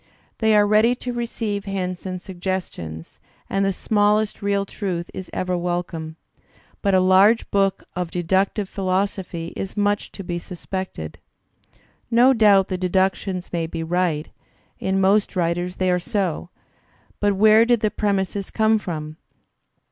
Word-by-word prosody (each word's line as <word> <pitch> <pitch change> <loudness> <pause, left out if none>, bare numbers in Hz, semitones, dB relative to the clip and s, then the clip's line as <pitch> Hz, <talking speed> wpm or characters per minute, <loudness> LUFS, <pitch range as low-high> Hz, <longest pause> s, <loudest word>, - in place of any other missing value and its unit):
They 220 -1 +4
are 205 0 +5
ready 215 +4 +4
to 245 0 -5
receive 225 -4 -3
hints 185 -2 -3
and 185 -1 -4
suggestions, 175 - -5 0.3
and 195 0 0
the 195 - +2
smallest 210 +2 +1
real 200 0 0
truth 185 -4 -4
is 185 - -7
ever 180 0 -1
wel 175 0 -1
come. 160 -2 -7 0.7
But 200 -2 +2
a - - +6
large 190 +5 +4
book 195 -1 +1
of 180 -1 -2
deductive 190 +4 0
philosophy 185 -3 -2
is 195 +2 -5
much 205 0 0
to 195 - -7
^ - - -14
be 175 -1 -3
isuspected. 180 - -6 0.9
No 245 +3 +5
doubt 205 -5 +5
the 185 -2 -2
deductions 185 0 0
may 165 -1 -1
be 165 0 -4
right; 165 -2 0 0.5
in. 190 0 0
most 200 +2 +3
writers 175 +1 -1
they 185 -1 +1
are 180 - +2
so; 180 -2 -2 0.7
but 205 -1 +2
where 215 +2 +6
did 235 -1 +2
the 215 - +1
premises 200 -1 -1
come 220 0 +2
from? 155 -5 -6
190 Hz, 150 wpm, -22 LUFS, 180-205 Hz, 0.9 s, a